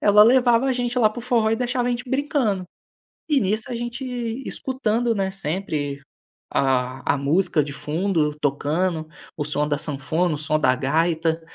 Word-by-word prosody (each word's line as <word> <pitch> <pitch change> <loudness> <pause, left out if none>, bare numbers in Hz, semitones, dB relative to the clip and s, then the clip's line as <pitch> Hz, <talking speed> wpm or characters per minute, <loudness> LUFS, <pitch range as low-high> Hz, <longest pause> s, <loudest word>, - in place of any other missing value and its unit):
ela 210 0 +6
levava 245 +1 +5
a 265 - +2
gente 245 0 -1
lá 215 -3 +4
para 240 - -8
o - - -6
forró 235 -3 +2
e 225 - +2
deixava 245 0 -1
a - - +1
gente 245 +1 -3
brincando. 260 -8 0 0.6
E 295 -5 +3
nisso 215 +3 0
a 245 - -3
gente 240 +2 -4 0.4
escutando, 240 -3 -1
né, 195 -3 -1
sempre 155 -6 -3 0.5
a 130 -1 +1
a - - -1
música 150 +3 +2
de 140 0 -5
fundo 155 0 0
tocando, 155 +3 -1 0.3
o 150 - -2
som 150 0 0
da 145 -1 0
sanfona, 150 +4 0
o - - -4
som 155 +1 +1
da 130 -4 +3
gaita, 160 +4 0
190 Hz, 175 wpm, -23 LUFS, 150-240 Hz, 0.6 s, ela